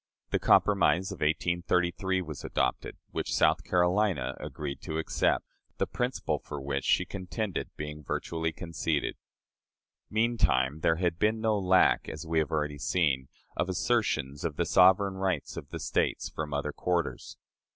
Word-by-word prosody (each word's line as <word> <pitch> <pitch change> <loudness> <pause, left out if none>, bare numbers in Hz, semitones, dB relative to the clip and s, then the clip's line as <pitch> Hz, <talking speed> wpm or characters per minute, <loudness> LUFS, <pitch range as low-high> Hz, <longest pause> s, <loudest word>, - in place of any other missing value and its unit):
The - - +2
compromise 95 -3 +3
of - - -6
1833 85 +3 0
was 75 -5 -8
adopted, - - -1
which - - -2
South 80 +1 +3
Carolina 90 +1 +1
agreed 70 -2 -5
to 80 - -4
accept, 80 - +1 0.3
the - - +1
principle 125 +1 -2
for 75 - -7
which 70 0 -3
she - - +3
contended 95 +1 -4
being 75 0 -6
virtually 80 +3 -2
conceded. 80 -3 -2 0.9
Meantime 110 - +2
there 80 - +3
had 85 0 -1
been 110 +1 +2
no 110 -1 +2
lack, 95 -1 +3
as 80 0 -7
we 80 0 +1
have 80 - 0
already 75 -2 -1
seen, 70 -5 +1 0.3
of 90 - -1
assertions 90 - 0
of 80 -3 -2
the 85 - 0
sovereign 95 +2 +5
rights 95 -1 -1
of - - -7
the - - -6
States - - 0
from 75 -1 -5
other 70 +1 -1
quarters. 85 +2 -2
85 Hz, 150 wpm, -29 LUFS, 75-95 Hz, 0.9 s, sovereign